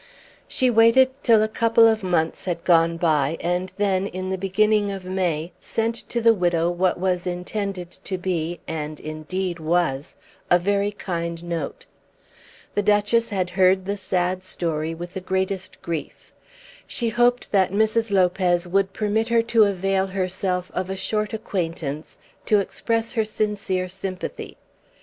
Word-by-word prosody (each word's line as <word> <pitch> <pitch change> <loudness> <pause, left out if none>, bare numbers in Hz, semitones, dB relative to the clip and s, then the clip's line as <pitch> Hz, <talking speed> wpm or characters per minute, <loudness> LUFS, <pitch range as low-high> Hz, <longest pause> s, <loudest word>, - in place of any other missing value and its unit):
She 255 -1 +1
waited 230 +3 +5
till 225 -3 +5
a - - +2
couple 230 +1 +4
of 220 -1 +2
months 175 -4 0
had 175 -2 -3
gone 165 -1 +4
by, 155 -2 +1
and 180 +2 -1
then, 195 -1 +1
in 185 -1 -5
the 190 - 0
beginning 205 +2 +2
of 195 -2 -6
May, 180 -3 -1
sent 225 +1 -1 0.2
to 235 - -1
the 230 0 +6
widow 175 -3 +1
what 175 0 +1
was 180 -1 0
intended 180 0 -3
to 190 - -2
be, 175 -2 -2
and 155 -1 -4
indeed 170 +4 -4
was, 160 -4 -1 0.3
a 175 - +6
very 200 +3 0
kind 170 -4 -4
note. 170 -4 -4 0.9
The 205 - +1
Duchess 210 +3 +2
had 185 -3 -1
heard 185 +1 +3
the 200 +1 -1
sad 185 -1 -1
story 165 -3 -2
with 175 +2 -8
the 190 - -5
greatest 190 0 -2
grief. 165 -3 -6 0.5
She 235 -2 -2
hoped 240 +2 +2
that 190 -3 +3
Mrs. 220 +2 +1
Lopez 180 -2 +2
would 195 +1 +1
permit 220 +1 0
her 235 -1 +3
to 230 -2 +4
avail 195 0 0
herself 185 -1 -2
of 185 0 -2
a 190 - -3
short 210 +2 -1
acquaintance 165 -8 -4 0.3
to 210 - +5
express 225 +3 -1
her 225 -3 +1
sincere 210 -4 -1
sympathy. 185 0 -6
185 Hz, 155 wpm, -23 LUFS, 175-210 Hz, 0.9 s, the